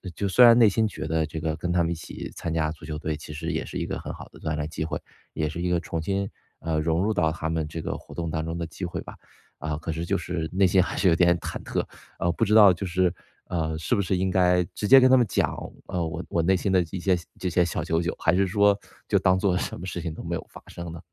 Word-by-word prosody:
就 100 - -1
虽 110 +6 +6
然 120 -1 +9
内 115 -2 +7
心 110 +2 +2
觉 105 - -6
得 80 0 +1
这 80 +1 -5
个 80 0 -1
跟 90 +2 -2
他 90 -1 +3
们 85 - -1
一 - - +1
起 80 - -8
参 85 - -4
加 80 -1 0
足 80 - -12
球 75 0 -5
队 75 0 -3
其 75 0 -10
实 75 - -4
也 - - -2
是 - - -6
一 - - -2
个 - - -4
很 - - -6
好 - - -9
的 - - -16
锻 75 - -2
炼 75 -1 -2
机 80 - -4
会， 80 - -3 0.3
也 75 - -1
是 80 +3 -5
一 90 - 0
个 90 -1 +2
重 85 -1 -4
新， 100 +4 -1 0.3
呃， 80 -1 -1
融 80 +3 +1
入 110 +2 +1
到 80 -5 +2
他 80 -1 -4
们 80 -2 -1
这 80 +2 -6
个 - - -3
活 - - -13
动 85 -2 -3
当 80 -1 -2
中 80 +1 -4
的 85 - -2
机 80 +4 -9
会 85 - -4
吧。 - - -10 0.5
啊， 75 -1 -3
可 80 +1 -4
是 80 +2 -3
就 - - +1
是 85 -2 -3
内 95 +1 +3
心 95 0 +4
还 - - -3
是 95 0 +4
有 85 - +4
点 85 0 +4
忐 - - -6
忑， - - -2 0.3
呃， 85 - +1
不 115 - -1
知 105 +1 +2
道 100 -4 +9
就 95 +3 -4
是 90 -1 +1 0.4
呃， 80 -2 -1
是 80 +9 -2
不 100 - +3
是 95 0 0
应 95 0 0
该 90 -1 +4
直 105 - -3
接 135 +3 +9
跟 130 0 +6
他 - - +8
们 120 - +4
讲， - - +1 0.3
呃， 90 -1 -2
我 80 - -5
我 85 - +1
内 95 +3 +3
心 95 - -1
的 95 -1 +4
一 95 - -4
些 95 +1 +2 0.2
这 95 - -2
些 90 - +3
小 85 - -2
九 80 0 0
九， 85 +1 -2
还 80 - +2
是 95 +1 +3
说 100 +1 +3 0.3
就 - - +3
当 95 0 +3
作 95 -1 +1
什 - - -4
么 90 - -7
事 90 -2 -4
情 85 -1 -3
都 - - -8
没 - - -4
有 - - -6
发 - - -13
生 85 -1 -7
呢？ 85 - -8
85 Hz, 325 characters per minute, -26 LUFS, 80-95 Hz, 0.5 s, 然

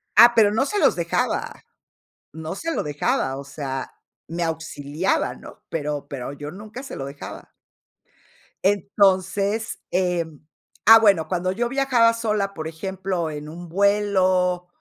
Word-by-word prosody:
Ah, 235 +3 +9
pero 210 -3 +5
no 225 +6 +1
se 415 +7 -1
los - - +4
dejaba, - - -2 0.7
no 160 +1 -6
se 330 +10 -3
lo - - 0
dejaba, 145 -2 -1
o 140 - -7
sea, 135 -1 -5 0.4
me 170 +2 -3
auxiliaba, 160 0 -1
¿no? - - -13
Pero 150 -2 -3
pero 135 -1 -5
yo 145 +1 -7
nunca 215 +7 -9
se 275 - -8
lo 135 - -5
dejaba. 140 +1 -9 1.1
Entonces, 200 +2 +1
em, 170 -5 -1 0.4
ah, 225 +2 +10
bueno, 195 -8 +4
cuando 180 +2 -1
yo 235 +5 -1
viajaba 255 -4 +3
sola, 210 -3 -1
por 160 -3 -5
ejemplo, 185 +1 -3
en 150 0 -7
un 170 +1 -9
vuelo 185 -2 +2
185 Hz, 140 wpm, -23 LUFS, 155-205 Hz, 1.1 s, ah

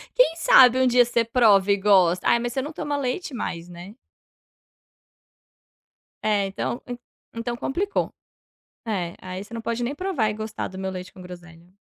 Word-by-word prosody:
Quem - - +4
sabe 260 -6 +6
um 260 - +3
dia 245 0 +5
você 235 -1 0
prove 205 -5 +4
e - - 0
gosta. 185 -3 +3
Ai, 235 - +5
mas 240 0 -3
você 265 - -1
não 295 +4 -6
toma 295 -1 -4
leite 275 +3 -3
mais, 170 -7 -5
né? 175 +5 -11 2.3
É 205 -2 +2
,então 195 +5 -4 0.5
então 235 +1 -4
complicou. 390 +12 -2 0.7
É, 185 -7 -3
aí 185 +1 -6
você 215 - -15
não 230 - -5
pode 235 +1 -3
nem 260 +4 -2
provar 305 - -1
e - - -3
gostar 220 0 -5
do 190 - -11
meu 190 0 -3
leite 185 -1 -8
com 185 - -13
groselha. 175 0 -13
220 Hz, 170 wpm, -24 LUFS, 185-250 Hz, 2.3 s, sabe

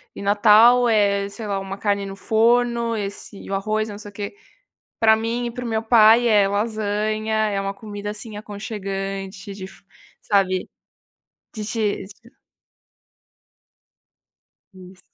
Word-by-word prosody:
e - - -8
Natal 220 +4 +5
é 200 -2 +2
sei 215 +2 -8
lá 200 -1 -2
uma 195 0 -6
carne 200 -1 0
no 195 0 -7
forno 235 +2 +2
esse 200 0 -6
e - - -10
o - - -1
arroz 215 +2 -1
e - - -7
não 205 - -8
sei 205 - -9
o - - -30
que", 205 - -6 0.7
pra 220 -1 +6
mim 230 +2 -2
e - - -3
para 245 +1 -7
o - - -3
meu 220 -1 -1
pai 225 +1 +6
é 205 -3 +4
lasanha, 215 +1 -1 0.2
é 200 -1 -1
uma 195 0 -3
comida, 205 0 -7
assim, 210 0 -8
aconchegante 195 -1 -6
de 190 -1 -7
fi - - -16 0.4
sabe? 190 -3 +1 0.9
De 215 -2 -5
te 210 -3 -2 2.7
Isso. 185 0 -14
210 Hz, 150 wpm, -22 LUFS, 200-220 Hz, 2.7 s, pra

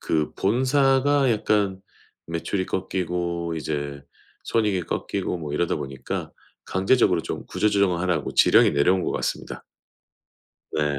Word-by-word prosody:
그 75 -1 -1
본사가 135 +4 +3
약간 100 -3 0 0.5
매출이 85 +3 -2
꺾이고 85 -3 -2
이제 70 -2 -4 0.4
손익이 105 -5 +1
꺾이고 90 - -3
뭐 75 -3 -6
이러다 85 +2 0
보니까 65 -1 -5 0.3
강제적으로 95 -3 +2
좀 - - -5
구조조정을 100 -4 +1
하라고 90 -5 -1
지령이 - - +6
내려온 90 +6 +3
것 - - -1
같습니다. - - -4 1.1
네. 75 -2 -1
90 Hz, 290 characters per minute, -24 LUFS, 80-105 Hz, 1.1 s, 지령이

